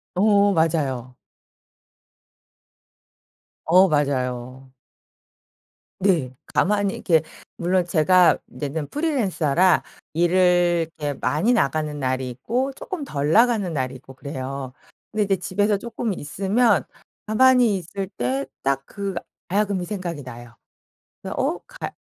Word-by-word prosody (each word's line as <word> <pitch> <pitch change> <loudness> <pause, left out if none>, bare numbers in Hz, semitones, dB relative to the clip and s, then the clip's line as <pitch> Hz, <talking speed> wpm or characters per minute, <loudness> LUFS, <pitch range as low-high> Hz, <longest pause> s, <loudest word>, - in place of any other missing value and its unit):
어 200 0 +4
맞아요. 140 -7 0 2.5
어 185 +4 +6
맞아요. 130 -3 -2 1.3
네. 165 -10 +1 0.2
가만히 200 0 +1
이렇게 160 -3 +2 0.3
물론 180 +1 +1
제가 175 +1 +4
인제는 145 +1 -4
프리랜서라 190 - +2 0.3
일을 175 0 +3
이렇게 145 -2 -3
많이 155 - +2
나가는 155 - 0
날이 130 -1 -1
있고 245 - -2
쪼끔 360 +2 -6
덜 145 - -2
나가는 225 -3 +3
날이 130 -2 -2
있고 130 +1 -13
그래요. 135 -1 -6 0.4
근데 215 -1 +1
이제 195 -1 +1
집에서 200 +3 0
쪼끔 230 -1 -3
있으면 200 +8 +1 0.4
가만히 240 -1 +4
있을 190 +3 -5
때 130 +3 -1 0.2
딱 135 0 0
그 200 +2 -5 0.4
가야금이 200 -1 0
생각이 175 -7 -5
나요. 120 -2 -11 0.7
그래서 - - -5
어 - - 0
가야 - - -7
175 Hz, 240 characters per minute, -23 LUFS, 140-200 Hz, 2.5 s, 어